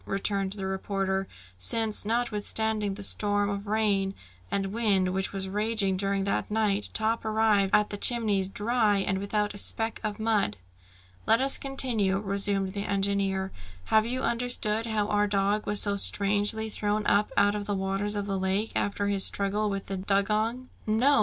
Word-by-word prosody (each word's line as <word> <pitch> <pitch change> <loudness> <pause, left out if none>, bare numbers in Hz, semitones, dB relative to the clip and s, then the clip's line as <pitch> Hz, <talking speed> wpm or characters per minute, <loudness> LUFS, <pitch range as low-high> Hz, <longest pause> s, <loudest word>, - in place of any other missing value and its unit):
returned 195 0 -1
the 195 -2 -5
reporter; 190 0 -2 0.3
"since 215 - +3
notwithstanding 220 -2 0
the 205 - -8
storm 205 0 +1
of 200 +1 -5
rain 200 -2 +1 0.3
and 195 - -1
wind 195 -5 +1
which 190 0 -1
was 195 -1 -4
raging 205 -1 0
during 195 +1 -1
that 200 - -1
night, 210 -1 0
Top 225 +1 -1
arrived 215 -3 +2
at 210 - +3
the 205 - -3
Chimneys, 210 -4 +1
dry 210 +1 +1
and 195 -1 -1
without 210 +1 -1
a 200 - -5
speck 225 +2 -1
of 215 -1 -3
mud!" 215 - 0 0.7
"Let 225 +1 +5
us 270 +1 +1
continue," 240 -8 +1
resumed 195 -1 -1
the 200 0 -4
engineer. 195 -1 0 0.3
"Have 220 0 +3
you 255 +2 -2
understood 230 -2 0
how 215 -2 0
our 210 0 +1
dog 200 +1 0
was 205 0 +2
so 200 -1 0
strangely 205 +2 +3
thrown 210 0 -2
up 205 +1 +2
out 205 0 +4
of 205 -1 -4
the 205 - -1
waters 195 +2 -2
of 205 -1 -2
the 195 -1 -2
lake, 190 +3 -1
after 200 0 -1
his 200 -1 +1
struggle 205 +1 0
with 195 -1 -4
the 195 - -4
dugong?" 215 +6 0 0.2
"No! 235 +5 +3
205 Hz, 170 wpm, -27 LUFS, 195-220 Hz, 0.7 s, Let